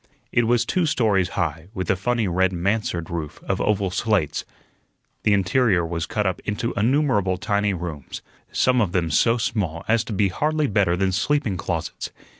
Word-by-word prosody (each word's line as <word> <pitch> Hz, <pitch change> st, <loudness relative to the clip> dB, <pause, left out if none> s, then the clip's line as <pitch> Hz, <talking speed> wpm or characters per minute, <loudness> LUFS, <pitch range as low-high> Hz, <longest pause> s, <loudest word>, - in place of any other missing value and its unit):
It 120 Hz, -1 st, +2 dB
was 120 Hz, 0 st, +3 dB
two 175 Hz, +6 st, +1 dB
stories 105 Hz, -9 st, +2 dB
high, 85 Hz, -2 st, -2 dB
with 95 Hz, -2 st, -3 dB
a -, -, +2 dB
funny 115 Hz, +3 st, 0 dB
red 95 Hz, +1 st, +2 dB
mansard 90 Hz, -2 st, -1 dB
roof 80 Hz, -2 st, -5 dB
of 95 Hz, 0 st, -1 dB
oval 100 Hz, -3 st, +1 dB
slates. 95 Hz, -6 st, 0 dB, 0.8 s
The 105 Hz, -, +3 dB
interior 100 Hz, -1 st, +2 dB
was 85 Hz, -1 st, -3 dB
cut 105 Hz, -2 st, -1 dB
up 95 Hz, -2 st, 0 dB
into 105 Hz, +3 st, -2 dB
innumerable 110 Hz, -5 st, +2 dB
tiny 105 Hz, 0 st, 0 dB
rooms, 80 Hz, -5 st, -6 dB, 0.3 s
some 125 Hz, -1 st, +3 dB
of 95 Hz, -5 st, 0 dB
them 85 Hz, -3 st, 0 dB
so 115 Hz, +9 st, +3 dB
small 95 Hz, -8 st, -2 dB
as 110 Hz, 0 st, +3 dB
to 115 Hz, -, -5 dB
be 100 Hz, 0 st, +2 dB
hardly 155 Hz, -, 0 dB
better 95 Hz, -7 st, +2 dB
than 95 Hz, 0 st, +1 dB
sleeping 105 Hz, +3 st, 0 dB
closets. 90 Hz, -, -4 dB
100 Hz, 175 wpm, -23 LUFS, 90-115 Hz, 0.8 s, was